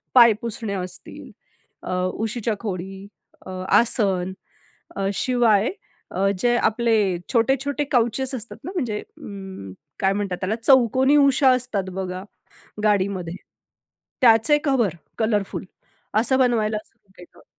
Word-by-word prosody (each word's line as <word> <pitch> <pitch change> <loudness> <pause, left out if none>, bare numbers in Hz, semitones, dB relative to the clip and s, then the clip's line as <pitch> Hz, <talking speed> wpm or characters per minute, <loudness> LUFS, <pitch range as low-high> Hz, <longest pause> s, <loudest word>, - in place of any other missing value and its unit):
पायपुसण्या 225 -3 +3
असतील, 180 0 -9 0.5
अ, - - -5 0.2
उशीच्या 225 0 -2
खोळी, 195 -1 -6 0.4
अ, - - -9 0.3
आसन, 195 -6 +1 0.6
अ, 195 0 -1
शिवाय 235 -2 +2 0.5
अ, 195 +1 +2
जे 240 +4 +2
आपले 230 0 +2 0.4
छोटे-छोटे 270 +4 +1
काउचेस 250 +2 +1
असतात 235 -2 -6
ना 360 - -4
म्हणजे 235 - -1
अं, 190 - -10 0.3
काय 190 0 +2
म्हणतात 195 -3 -2
त्याला 195 +3 0
चौकोनी 260 +2 +4
उशा 280 -1 +5
असतात 245 -7 -1
बघा 185 0 -4 0.6
गाडीमध्ये. 190 -4 0 0.9
त्याचे 235 +4 +5
कव्हर, 240 - +1 0.2
कलरफुल 210 -4 -1 0.5
असं 260 +4 +2
बनवायला 220 -4 +2
सुरू 190 - -33
केलं. 175 - -16
220 Hz, 115 wpm, -23 LUFS, 195-245 Hz, 0.9 s, उशा